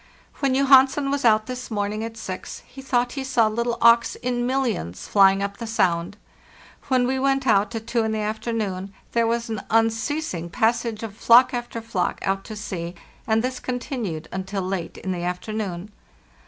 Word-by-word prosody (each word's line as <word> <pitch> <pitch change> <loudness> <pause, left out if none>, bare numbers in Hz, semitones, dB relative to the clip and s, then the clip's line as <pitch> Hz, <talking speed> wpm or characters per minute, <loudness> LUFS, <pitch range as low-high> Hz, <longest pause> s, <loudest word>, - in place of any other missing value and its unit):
"When 270 -2 +1
Johansen 275 +1 +5
was 280 0 -1
out 215 -1 +4
this 255 0 -6
morning 210 0 -2
at 225 0 -6
six, 190 -4 -7
he 270 - -12
thought 245 -2 0
he 270 - -4
saw 255 -4 +2
little 235 +2 -1
auks 235 0 +5
in 245 -1 -2
millions 235 - -2
flying 195 -1 +5
up 200 0 -4
the 230 - -6
sound. 180 -3 0 0.7
When 255 -2 +3
we 260 +1 0
went 270 0 +1
out 210 -1 +2
at 225 0 -5
two 230 0 0
in 220 - -1
the 220 - -1
afternoon 210 -3 -3 0.2
there 230 -1 +2
was 235 0 -1
an 220 -2 -4
unceasing 225 - 0
passage 230 +1 0
of 215 -3 -6
flock 240 +4 +6
after 240 -1 -4
flock 220 -6 -2
out 195 0 0
to 215 - -7
sea, 180 -4 -5 0.3
and 220 0 +2
this 255 0 -2
continued 240 - -4
until 190 +1 -3
late 185 -2 -4
in 190 - -4
the 180 -1 -3
afternoon. 180 +1 -4
225 Hz, 180 wpm, -23 LUFS, 195-245 Hz, 0.7 s, flock